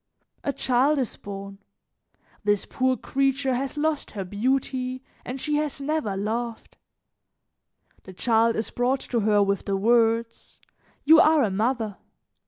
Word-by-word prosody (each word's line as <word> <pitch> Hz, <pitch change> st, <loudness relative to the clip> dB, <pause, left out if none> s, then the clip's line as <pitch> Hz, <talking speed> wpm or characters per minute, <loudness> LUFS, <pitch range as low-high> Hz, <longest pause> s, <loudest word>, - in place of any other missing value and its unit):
A 280 Hz, -, 0 dB
child 270 Hz, +3 st, +2 dB
is 255 Hz, -6 st, -2 dB
born. 200 Hz, 0 st, -8 dB, 0.8 s
This 205 Hz, -1 st, +1 dB
poor 260 Hz, 0 st, 0 dB
creature 270 Hz, 0 st, 0 dB
has 270 Hz, +3 st, -3 dB
lost 305 Hz, 0 st, -1 dB
her 195 Hz, -, -2 dB
beauty 255 Hz, +5 st, -1 dB, 0.2 s
and 255 Hz, +2 st, -6 dB
she 300 Hz, +2 st, 0 dB
has 300 Hz, -2 st, -2 dB
never 280 Hz, -9 st, -2 dB
loved. 225 Hz, +3 st, -4 dB, 1.3 s
The 185 Hz, -, -10 dB
child 230 Hz, +3 st, +2 dB
is 220 Hz, -, -3 dB
brought 255 Hz, +2 st, 0 dB
to 240 Hz, -, -1 dB
her 210 Hz, -1 st, +3 dB
with 200 Hz, 0 st, -1 dB
the 195 Hz, -1 st, 0 dB
words: 230 Hz, +2 st, +1 dB, 0.5 s
'You 315 Hz, +2 st, +8 dB
are 315 Hz, -4 st, +5 dB
a 210 Hz, -, 0 dB
mother.' 220 Hz, 0 st, -1 dB
245 Hz, 140 wpm, -25 LUFS, 210-270 Hz, 1.3 s, You